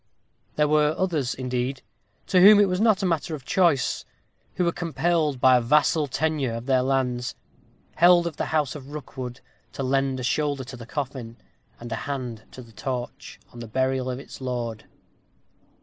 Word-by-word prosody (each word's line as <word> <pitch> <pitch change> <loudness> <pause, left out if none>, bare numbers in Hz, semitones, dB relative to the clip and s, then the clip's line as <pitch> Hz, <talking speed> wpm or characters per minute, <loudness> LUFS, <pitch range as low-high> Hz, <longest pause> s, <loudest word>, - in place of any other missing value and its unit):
There 150 0 +3
were 150 0 +3
others, 160 -9 -1
indeed, 125 +1 -3 0.4
to 185 -2 +3
whom 205 +2 +9
it 205 - +5
was 180 +1 -1
not 215 -3 +3
matter 165 -3 0
of 135 -4 -11
choice; 170 -8 +2 0.5
who 180 - +1
were 170 - +2
compelled, 165 -4 0
by 130 0 +6
a - - +1
vassal 150 +4 +3
tenure 145 -4 -1
of 115 +1 -6
their 130 -1 +3
lands, 125 -2 -1 0.6
held 175 0 +6
of 170 -3 -3
the - - -1
house 150 -4 0
of 145 -1 -10
Rookwood, 130 -3 -7 0.3
to 135 - -4
lend 135 0 0
a - - -5
shoulder 145 +1 0
to 130 +1 -9
the 120 -2 -11
coffin, 130 -5 -5 0.4
and 120 0 -9
a - - 0
hand 125 -5 -5
to 130 - -11
the 115 - -17
torch, 125 +4 -6
on 120 - -10
the 115 - -7
burial 130 +2 0
of 125 - -3
its 135 - -11
lord. 120 -4 -4
135 Hz, 180 wpm, -25 LUFS, 125-155 Hz, 0.6 s, whom